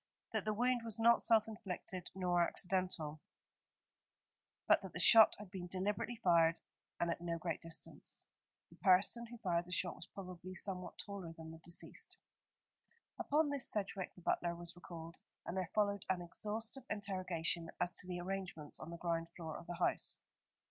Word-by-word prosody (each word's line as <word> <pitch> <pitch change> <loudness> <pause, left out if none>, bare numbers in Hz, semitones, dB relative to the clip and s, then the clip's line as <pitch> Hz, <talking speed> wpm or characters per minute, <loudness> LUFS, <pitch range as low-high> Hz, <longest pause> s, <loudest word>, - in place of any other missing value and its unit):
That - - 0
the 215 - +1
wound 245 +2 +2
was 225 -1 -3
not 235 +1 +6
self 225 -1 +5
inflicted 190 -3 -6
nor 180 -2 +2
accidental; 180 -4 0 1.5
but - - +6
that - - -8
the - - -4
shot 225 -2 +9
had 210 -3 -10
been 180 -2 -5
deliberately 195 +6 -1
fired 170 -6 +4 0.4
and 170 0 +2
at 170 - -3
no 170 -1 -1
great 165 -1 -3
distance. 165 -1 -4 0.5
The - - -16
person 200 +5 +4
who 240 +1 -9
fired 175 -6 0
the 180 - -11
shot 175 0 0
was 170 - -10
probably 185 -1 -7
somewhat 185 -1 -3
taller 195 -5 -6
than 160 -1 -9
the 160 - -10
deceased. 170 +1 -3 1.0
Upon 295 0 +2
this 280 -3 +4
Sedgewick, 195 -2 -2
the 180 - -14
butler, 170 0 +1
was 170 0 -4
recalled, 170 -2 -8 0.3
and 175 - -4
there 185 -3 -1
followed 205 -2 +2
an 180 -2 +1
exhaustive 215 +8 -3
interrogation 185 -5 -1
as 180 0 +1
to 180 - -4
the 175 -1 -3
arrangements 180 -5 -4
on - - -7
the 170 - -6
ground 165 -1 -1
floor 160 -3 -5
of - - -8
the 175 - -4
house. - - +1
180 Hz, 170 wpm, -38 LUFS, 170-205 Hz, 1.5 s, shot